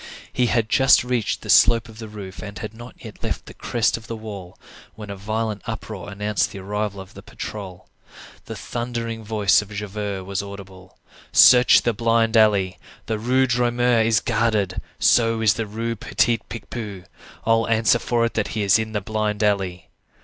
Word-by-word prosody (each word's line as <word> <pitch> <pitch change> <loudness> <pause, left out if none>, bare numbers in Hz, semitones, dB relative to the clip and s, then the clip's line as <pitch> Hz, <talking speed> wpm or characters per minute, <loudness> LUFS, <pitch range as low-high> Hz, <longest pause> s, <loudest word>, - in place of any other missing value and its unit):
He 125 -1 +2
had 115 -1 +1
just 135 +3 +5
reached 125 -4 -2
the - - -9
slope 115 0 +5
of 110 0 -14
the 110 - -7
roof, 100 -3 -9
and 105 -1 -8
had 110 - -6
not 120 +2 -11
yet 110 - -11
left - - -4
the - - -11
crest 115 -1 0
of 110 - -13
the 115 - -5
wall, 100 -5 -9 0.4
when 105 -2 -8
a - - -5
violent 110 +1 -3
uproar 110 -4 -6
announced 105 -1 -1
the - - -9
arrival 100 +1 -3
of 95 -1 -11
the - - -11
patrol. 95 -4 -8 0.6
The - - -7
thundering 115 -2 -4
voice 105 -2 +3
of 105 - -11
Javert 100 -1 -4
was 100 0 -2
audible:— 95 -2 -11 0.3
"Search 125 -1 +7
the 120 - +1
blind 115 +1 +1
alley! 100 -4 +3 0.3
The 110 -1 -2
Rue 130 +4 +2
Droit 120 -1 +1
Mur 120 -1 +3
is 110 0 +2
guarded! 105 -5 0 0.2
so 115 -1 +3
is 110 -3 +4
the 110 0 -4
Rue 115 +3 -3
Petit 115 +2 +1
Picpus. 105 -4 -7 0.4
I'll 115 0 +2
answer 115 -1 +3
for 120 -2 0
it 115 - -3
that 110 - -1
he 105 - 0
is 100 +2 +4
in 110 0 -4
the 105 - -1
blind 105 +1 -2
alley." 95 -4 -1
110 Hz, 185 wpm, -22 LUFS, 100-115 Hz, 0.6 s, Search